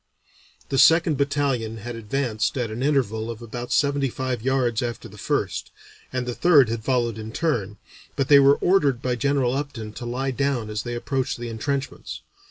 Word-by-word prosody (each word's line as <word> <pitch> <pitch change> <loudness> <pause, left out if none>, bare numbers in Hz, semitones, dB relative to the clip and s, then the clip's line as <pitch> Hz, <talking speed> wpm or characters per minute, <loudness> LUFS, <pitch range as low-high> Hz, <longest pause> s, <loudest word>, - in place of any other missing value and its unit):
The 135 - +1
second 165 +3 +5
battalion 140 -6 0
had 120 +2 -6
advanced 115 0 -1
at 120 -3 -2
an 115 +3 -5
interval 120 -6 0
of 115 -2 -6
about 120 +1 -7
seventy 140 -1 +2
five 130 -2 -3
yards 125 -3 +1
after 120 -1 -4
the 105 -1 -14
first, - - -2 0.4
and 130 -1 -2
the 125 - -3
third 145 -5 +5
had 115 -1 -3
followed 120 -3 0
in 110 0 -7
turn, 115 - -1 0.4
but 135 - 0
they 140 0 +8
were 140 +1 +6
ordered 145 -9 +3
by 125 - 0
General 135 -1 +1
Upton 130 -7 -5
to 120 - -7
lie 130 +3 -2
down 130 -5 -1
as 105 0 -2
they 120 -1 -5
approached 130 +2 -2
the 120 0 -5
entrenchments. 135 +5 -4
125 Hz, 180 wpm, -24 LUFS, 115-140 Hz, 0.4 s, they